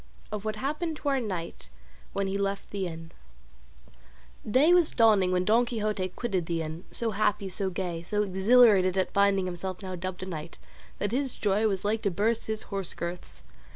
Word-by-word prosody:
OF 210 -1 -4
WHAT 215 0 -1
HAPPENED 300 +7 -2
TO 290 - -2
OUR 275 -1 +2
KNIGHT 185 -8 -5 0.4
WHEN 200 - 0
HE 195 +1 -1
LEFT 200 0 -2
THE 195 -2 -2
INN 165 -1 -8 1.4
Day 285 +10 +5
was 350 -3 +5
dawning 210 -6 +4
when 180 0 +1
Don 225 +4 +4
Quixote 215 -5 -2
quitted 190 -8 -2
the 165 -1 -1
inn, 160 +3 -7
so 230 -1 -2
happy, 205 -1 0
so 190 +1 -2
gay, 175 -2 -3
so 210 +5 0
exhilarated 195 -1 +5
at 190 - 0
finding 200 -1 +3
himself 185 +2 -5
now 185 -1 -5
dubbed 185 +1 -5
a - - -3
knight, 165 -3 -7 0.4
that 205 - -1
his 265 +1 -1
joy 210 +2 +1
was 195 -1 -2
like 215 +1 +1
to 200 - +1
burst 215 +6 0
his 220 0 -3
horse 195 -3 -3
girths. 170 +1 -6
200 Hz, 190 wpm, -28 LUFS, 185-220 Hz, 1.4 s, Day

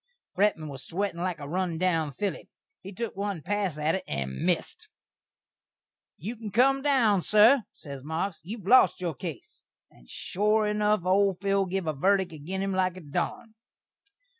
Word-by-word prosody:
Fretman 190 -6 +1
was 135 -2 -8
a - - -12
swettin' 185 0 -2
like 180 -3 -2
a 145 - -7
run 175 +1 -1
down 165 -4 +1
filly. 200 +8 -4 0.3
He 195 - -9
took 220 +3 -5
one 200 -5 -3
pass 200 -6 -1
at 155 +2 +1
it, 190 - -2
and 70 -2 -3
missd. - - -1 1.3
"You 215 +10 -5
can 220 -2 -7
cum 265 +6 +3
down, 245 -9 +3
sur," 215 +5 +5
ses 140 -3 -10
Marks, 160 +4 -3
"you've 200 +4 -8
lost 200 -5 +5
your 175 -3 -2
case;" 160 -3 -8 0.3
and - - -21
shore 210 +3 +1
enuf, 210 -2 +1
old 190 0 +3
Phil 195 0 +1
giv 190 0 -2
a 155 - -1
verdik 190 +4 +1
agin 180 +6 -4
him 195 - -1
like 185 -1 0
a - - -8
darn. 165 +8 -4
190 Hz, 170 wpm, -27 LUFS, 165-210 Hz, 1.3 s, sur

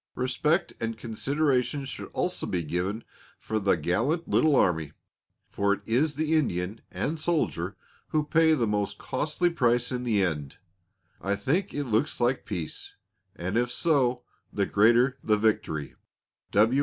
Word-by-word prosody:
Respect 150 +7 0
and 115 -1 -2
consideration 135 +4 0
should 135 - -7
also - - -2
be 85 -4 -2
shown 95 +7 -2 0.3
for 110 0 -2
the 100 -3 +2
gallant 115 - 0
little 155 -2 +3
army, 80 - +2 0.6
for 100 0 +2
it 100 - -5
is 135 +7 +1
the 155 +2 0
Indian 105 - 0
and 160 +2 -2
soldier 105 - -1 0.3
who 155 -1 0
pay 160 +1 +4
the 120 -6 +1
most 105 -1 -1
costly 155 +6 -1
price 120 -5 +1
in 125 -1 -2
the 110 -5 +2
end. 75 -6 -3 0.6
I 100 +3 0
think 170 - -1
it 145 - -1
looks 120 +4 0
like 125 +2 +1
peace, 90 -7 -5 0.4
and 95 +4 -3
if 120 0 +1
so 125 -5 +1 0.3
the 100 - 0
greater 120 +7 +4
the 105 -1 +3
victory. 100 -9 0
120 Hz, 145 wpm, -27 LUFS, 100-145 Hz, 0.6 s, pay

